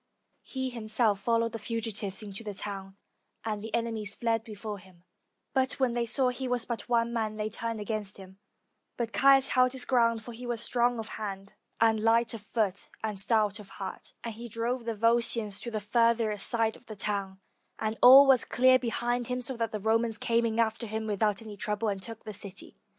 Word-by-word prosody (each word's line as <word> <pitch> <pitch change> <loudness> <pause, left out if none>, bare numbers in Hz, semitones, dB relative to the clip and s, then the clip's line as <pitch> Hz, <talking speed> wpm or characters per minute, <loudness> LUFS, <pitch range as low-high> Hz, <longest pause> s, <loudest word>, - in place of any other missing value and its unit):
He 260 -1 -4
him 230 -3 -7
self 215 -2 +2
followed 230 +2 +1
the 225 - -5
fugitives 215 -2 -3
into 205 +2 -8
the 205 -2 -6
town, 195 0 -5 0.5
and 215 -2 -3
the 220 - -6
enemy 230 -2 -1
fled 225 +2 -1
before 215 -2 -7
him; 180 -2 -19 0.5
but 260 -1 +2
when 260 -3 0
they 235 -1 -1
saw 255 +2 +3
that 250 - -5
he 265 - -3
was 245 -1 0
but 235 -1 -5
one 235 -1 +2
man, 220 -2 -1
they 215 0 -3
turned 230 0 -3
against 210 -1 -3
him, 190 0 -13 0.6
but 230 -1 -3
Caius 270 0 +6
held 255 0 +3
his 260 -2 0
ground, 230 -3 +2
for 240 - -8
he 240 +2 -8
was 240 -1 -2
strong 240 +1 +1
of 220 -1 -5
hand, 200 -2 -6 0.3
and 225 -1 +4
light 230 +1 +3
of 225 - -6
foot, 205 -3 -2
and 210 -3 -2
stout 210 0 +2
of 205 - -12
heart, 190 -2 -6
and 230 - -4
he 235 +2 -9
drove 235 +2 -2
the 230 -1 -2
Volscians 230 -2 +2
to 235 - -5
the 220 -2 -2
farthest 225 -1 +2
side 225 -2 +1
of - - -19
the 215 - -7
town, 195 -2 -2 0.4
and 220 0 -2
all 265 +3 +10
was 265 -3 +5
clear 255 +1 +4
behind 240 0 -1
him; 250 0 -2
so 250 +1 -1
that 230 -1 -2
the 215 - -3
Romans 225 +2 +1
came 230 0 +1
in 225 0 -2
after 225 0 0
him 220 +1 -3
without 210 0 0
any 215 -2 -8
trouble, 210 +2 -2
and 195 -1 -3
took 225 +2 -8
the 215 - -7
city. 200 -1 -5
225 Hz, 210 wpm, -29 LUFS, 210-235 Hz, 0.6 s, all